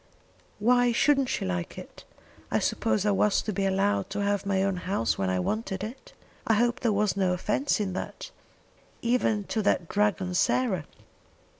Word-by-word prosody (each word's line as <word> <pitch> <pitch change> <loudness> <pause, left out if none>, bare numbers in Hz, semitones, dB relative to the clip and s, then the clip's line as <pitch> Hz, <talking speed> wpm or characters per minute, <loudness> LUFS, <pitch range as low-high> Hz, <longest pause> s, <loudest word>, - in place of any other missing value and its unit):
"Why 245 +3 +3
shouldn't 275 +2 +3
she - - -2
like 90 -2 -3
it? - - -11 0.4
I - - +1
suppose 110 - 0
I 210 - +3
was 200 +1 +2
to 215 - -3
be 195 +1 0
allowed 195 +2 +1
to 205 +1 -3
have 200 0 0
my 190 -1 +1
own 195 -2 0
house 180 - -1
when 95 -1 -1
I 95 0 0
wanted 195 - -2
it? 235 +5 -8 0.3
I 225 - +4
hope 240 +2 +1
there 235 - +1
was 210 -1 +1
no 190 -2 +1
offence 210 +10 0
in 195 -3 -2
that, - - -6 0.7
even 235 -3 +1
to 220 +2 -2
that 185 -4 +1
dragon 200 -2 0
Sarah? 185 - +1
205 Hz, 175 wpm, -27 LUFS, 190-225 Hz, 0.7 s, I